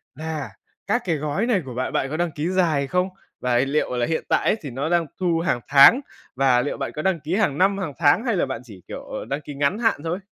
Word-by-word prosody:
là 155 -5 -5 0.4
các - - +1
cái 165 -3 +1
gói 150 +9 -1
này 215 -7 +2
của 125 - -7
bạn 130 +2 -3
bạn 135 - 0
có 155 - -3
đăng 175 -2 0
ký 150 +4 -3
dài 160 -7 +1
không? 180 +4 0 0.3
Và 125 -1 +1
liệu 135 +1 0
là 120 - +1
hiện 160 - -1
tại - - +2
ấy - - +4
thì 145 - -6
nó 135 +6 -3
đang 170 -1 +2
thu 175 -3 +1
hàng 165 -7 0
tháng 140 - +7 0.3
và 130 -2 +3
liệu 145 - -3
bạn 135 - -3
có 150 - -3
đăng 185 0 +1
ký 155 +5 -2
hàng 175 -10 +1
năm, 195 +3 +3
hàng 165 -8 -4
tháng 170 - +4
hay 230 -5 +1
là - - +1
bạn 130 -3 -5
chỉ, 105 -7 -13
kiểu, - - -7
ờ, - - -6
đăng 140 +2 -3
ký 145 - -8
ngắn 145 +10 0
hạn 225 -10 +1
thôi? 170 +3 -2
155 Hz, 265 wpm, -23 LUFS, 135-180 Hz, 0.4 s, tháng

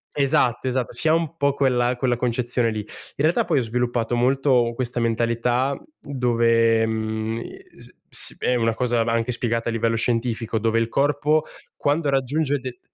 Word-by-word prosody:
Esatto, 130 -3 +1
esatto. 130 -2 -1
Si - - 0
ha 155 - +5
un 165 0 -1
po' 140 -2 +2
quella 125 -3 +1
quella 125 -1 0
concezione 120 -1 0
lì. 110 - -3
In 105 - -6 0.3
realtà 155 +4 +2
poi 155 -5 +2
ho - - 0
sviluppato 120 0 -1
molto 125 -1 +2
questa 125 0 -2
mentalità 120 +3 0 0.2
dove, 115 -4 +2
mhmm, 110 0 -3
e - - -12
s - - -12 0.2
s - - +1
è 125 - +1
una 115 -1 +1
cosa 120 0 0
va 115 - -1
anche 115 +1 0
spiegata 115 -1 -1
a - - -1
livello 115 0 0
scientifico, 115 -1 -1
dove 115 +1 +1
il 115 - 0
corpo 150 +4 +1 0.3
quando 145 +1 0
raggiunge 140 +2 0
de 130 -1 -8
120 Hz, 175 wpm, -23 LUFS, 115-135 Hz, 0.3 s, ha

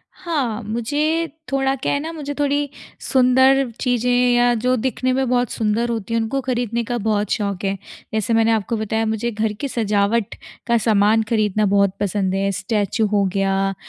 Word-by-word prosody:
हाँ। 275 -11 -2
मुझे 295 +10 -1 0.2
थोड़ा 270 0 +1
क्या 265 - -2
है 285 - 0
ना, 320 +3 -5
मुझे 290 -3 -5
थोड़ी 285 0 +1 0.3
सुंदर 260 +1 +3
चीज़ें 245 -1 0 0.3
या 240 0 +4
जो 250 +3 +1
दिखने 255 +2 -1
में 265 0 0
बहुत 245 -2 +1
सुंदर 225 +2 0
होती 230 -1 -3
हैं 230 - +2
उनको 240 +5 -1
ख़रीदने 240 -2 -1
का 240 +2 -3
बहुत 210 -2 -1
शौक 200 -3 -2
है 195 0 -1 0.4
जैसे 220 +1 0
मैंने 225 0 +3
आपको 225 +1 0
बताया 220 +1 -1
मुझे 220 +2 -1
घर 215 0 -1
की 280 +7 -4
सजावट 210 -2 0 0.3
का 235 0 +3
सामान 220 0 +3
ख़रीदना 215 -2 +1
बहुत 200 -1 +2
पसंद 190 -1 -1
है 195 0 0
स्टैच्यू 205 +3 -1
हो 205 -1 +1
गया 195 0 +1
225 Hz, 175 wpm, -20 LUFS, 210-255 Hz, 0.4 s, या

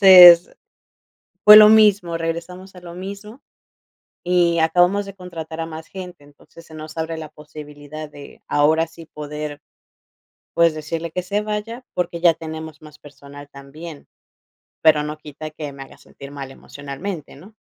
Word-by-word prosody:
entonces 180 -3 +9 0.9
fue 210 - +11
lo 215 0 +10
mismo, 200 -6 +4
regresamos 170 +3 -6
a 180 - -12
lo 170 -1 -11
mismo 200 +6 -9 0.9
y 175 -1 +2
acabamos 175 +5 +2
de 195 - -9
contratar 165 -3 -8
a 165 - -4
más 160 0 -9
gente, 180 -5 -10
entonces 145 +3 -18
se 160 - -16
nos 155 +1 -10
abre 160 0 -3
la 155 -2 -8
posibilidad 150 0 -11
de 145 -1 -14
ahora 155 +3 +2
sí 165 0 -14
poder, 150 -1 -7 0.9
pues, 170 -1 +3
decirle 160 +2 -5
que 180 - -3
se 200 +3 -2
vaya 215 +4 -5
porque 170 -1 -3
ya 170 -1 +5
tenemos 160 -1 -9
más 150 -1 -15
personal 145 0 -14
también, 145 +3 -11 0.7
pero 150 -1 +4
no 150 +1 -6
quita 155 +1 -9
que 150 -1 -7
me 135 -1 -10
haga - - -17
sentir 140 0 -13
mal 140 -2 -8
emocionalmente, 145 +6 -8
¿no? 190 +10 -16
160 Hz, 155 wpm, -20 LUFS, 150-180 Hz, 0.9 s, fue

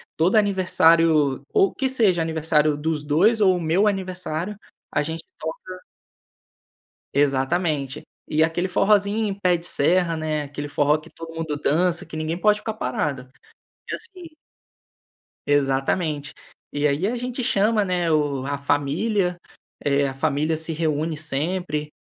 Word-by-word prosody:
todo 175 +6 +2
aniversário, 165 -8 +3
ou 195 - +3
que 265 - -1
seja, 210 -10 +2
aniversário 155 -2 +1
dos 150 0 -2
2 190 +10 +3
ou 190 -3 +4
o - - -4
meu 170 +6 +2
aniversário, 185 -1 -3 0.4
a - - +2
gente 160 +2 -4 0.2
toca 185 +3 -6 1.4
Exatamente. 145 +1 0 0.2
E 155 +1 +1
aquele 165 +3 +1
forrozinho 200 +2 +2
pé 180 -2 +3
de 170 - -7
serra, 170 +2 +2
né, 155 -1 -2
aquele 145 0 -6
forró 145 +1 +2
que 155 +2 -14
todo 165 0 -10
mundo 160 -2 -3
dança, 175 +4 +2
que - - -9
ninguém 155 +1 -2
pode 210 +2 +3
ficar 215 +1 -5
parado. 130 -5 -3 0.6
E - - -3
assim 365 -8 -9 1.1
Exatamente. 145 +2 0 0.4
E 145 +1 0
aí 145 +6 0
a 230 - -1
gente 250 +1 -4
chama, 215 -1 +2
né, 180 -3 0
o 145 -4 0
a 140 0 -2
família, 165 +7 0 0.5
eh, 140 0 +2
a 135 - -4
família 150 +3 0
se 160 +1 -4
reúne 155 0 -1
sempre. 150 0 -3
160 Hz, 140 wpm, -23 LUFS, 145-185 Hz, 1.4 s, ou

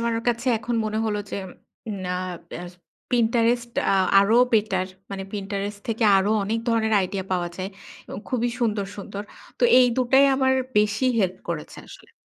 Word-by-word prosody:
আমার 230 0 0
কাছে 235 +2 -1
এখন 235 +2 -3
মনে 215 0 -2
হল 215 -2 -1
যে - - -3 0.7
না, 180 - -3 0.5
এ্যার 175 +1 -7 0.4
Pinterest 235 0 +2 0.2
আ - - +4 0.3
আরো 215 +4 +3 0.2
বেটার। 205 -4 +2 0.2
মানে 195 -1 -4
Pinterest 200 0 -4
থেকে 225 0 0
আরও 195 +2 +2
অনেক 220 +3 -1
ধরনের 220 -1 +1
আইডিয়া 190 0 -3
পাওয়া 175 -1 0
যায়। 190 +1 -4 0.4
এবং - - -7
খুবই 245 -1 0
সুন্দর, 210 -4 0
সুন্দর। 200 0 -6 0.4
তো - - +3
এই 250 - +6
দুটাই 260 +2 +4
আমার 265 0 +3 0.3
বেশি 210 +5 +2
হেল্প 185 -3 +1
করেছে 160 -3 -5
আসলে। - - -14
215 Hz, 160 wpm, -24 LUFS, 195-235 Hz, 0.7 s, এই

